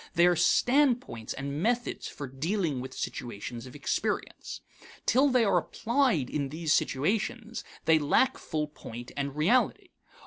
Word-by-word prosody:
They 170 0 +6
are 175 0 +5
standpoints 245 - +2
and 140 +2 -4
methods 240 +4 0
for 145 - -6
dealing 150 +2 -1
with 130 - -8
situations 120 +1 -5
of 125 - -12
experience. 145 - -2 0.4
Till 275 +3 +4
they 250 -2 +4
are 200 - +4
applied 235 - +1
in 140 -1 -2
these 160 +1 0
situations 220 - 0 0.2
they 160 0 +5
lack 255 - +2
full 150 -1 -2
point 120 -4 -9
and 140 -1 -3
reality. 210 +12 +2
160 Hz, 140 wpm, -29 LUFS, -, 0.4 s, They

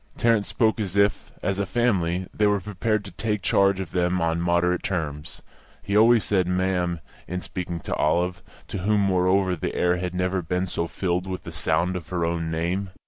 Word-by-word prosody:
Tarrant 115 -3 +2
spoke 110 -2 +1
as 100 -3 -3
if, 100 -1 +2
as 100 0 0
a 100 - +1
family, 95 -7 +1
they 105 - +2
were 105 0 +2
prepared 105 +2 -1
to 100 - -8
take 105 +2 -2
charge 100 -1 +3
of 95 -3 -5
them 90 0 +1
on 85 0 0
moderate 85 +1 +2
terms. 75 -5 -4 0.4
He 100 - -2
always 115 +1 +6
said 95 -3 +1
"ma'am" 90 -2 0 0.3
in 90 +1 -4
speaking 90 -2 -4
to - - -4
Olive, 90 +4 +1 0.3
to - - -4
whom, 105 +3 +2
moreover, 95 0 +2
the 80 - -4
air 90 0 +2
had 90 0 -4
never 90 +1 0
been 90 +2 -1
so 85 -2 -2
filled 90 +1 -2
with 95 -1 -5
the 85 - -7
sound 80 +3 0
of 85 -2 -6
her 85 -2 -1
own 85 -1 -1
name. 85 +4 -1
90 Hz, 195 wpm, -25 LUFS, 85-100 Hz, 0.4 s, always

